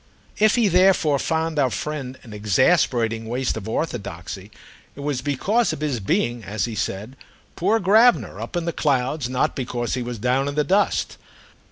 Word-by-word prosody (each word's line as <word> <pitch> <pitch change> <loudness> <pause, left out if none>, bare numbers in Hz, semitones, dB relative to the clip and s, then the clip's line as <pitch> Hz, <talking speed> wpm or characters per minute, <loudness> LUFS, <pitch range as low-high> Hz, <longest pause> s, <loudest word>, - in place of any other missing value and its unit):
If 215 0 +4
he 235 -3 +3
therefore 180 -6 +4
found 160 0 -1
our 135 -2 +3
friend 130 +2 -4
an 110 - -11
exasperating 115 - +2
waste 125 +3 -1
of 110 -1 -6
orthodoxy 100 - -4 0.5
it 140 - -9
was 140 -3 -2
because 195 - +1
of - - -7
his 145 -6 -1
being, 120 - -1
as 105 +3 -2
he 115 - -5
said, 105 +4 -4 0.4
poor 205 +6 +2
Gravener, 220 +6 +4
up - - -4
in 170 - -2
the 170 - -2
clouds, 135 -2 0
not 130 0 0
because 120 -2 -3
he 125 - -1
was 120 0 -5
down 125 +5 +1
in 145 - -3
the 150 - +2
dust. 195 +6 +1
135 Hz, 175 wpm, -22 LUFS, 120-165 Hz, 0.5 s, If